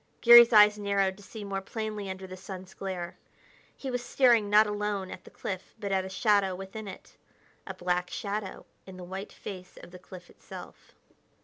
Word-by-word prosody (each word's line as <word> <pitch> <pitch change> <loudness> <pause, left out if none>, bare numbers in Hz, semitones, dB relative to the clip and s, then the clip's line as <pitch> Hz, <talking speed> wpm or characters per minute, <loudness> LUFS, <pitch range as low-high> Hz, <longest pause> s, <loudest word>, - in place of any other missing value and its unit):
Garry's 235 0 +9
eyes 210 -1 +7
narrowed 200 -2 0
to 205 - -16
see 210 +1 -9
more 195 -1 -3
plainly 215 -1 -5
under 190 0 -6
the 185 0 -9
sun's 185 0 -9
glare. 185 -3 -6 0.6
He 270 - -5
was 245 -1 -2
staring 240 -4 +3
not 210 +1 +6
alone 205 -2 -3
at 180 - -10
the - - -12
cliff 190 -1 -7
but 200 -2 -4
at 190 -1 +1
a 190 - -7
shadow 195 -1 +2
within 195 +3 -8
it 190 - -11 0.5
a - - -6
black 180 0 -1
shadow 205 -1 -5 0.2
in 190 -1 -10
the 180 - -9
white 190 +3 -7
face 185 -2 -10
of - - -12
the 180 - -11
cliff 180 -1 -12
itself. - - -13
195 Hz, 190 wpm, -28 LUFS, 185-210 Hz, 0.6 s, Garry's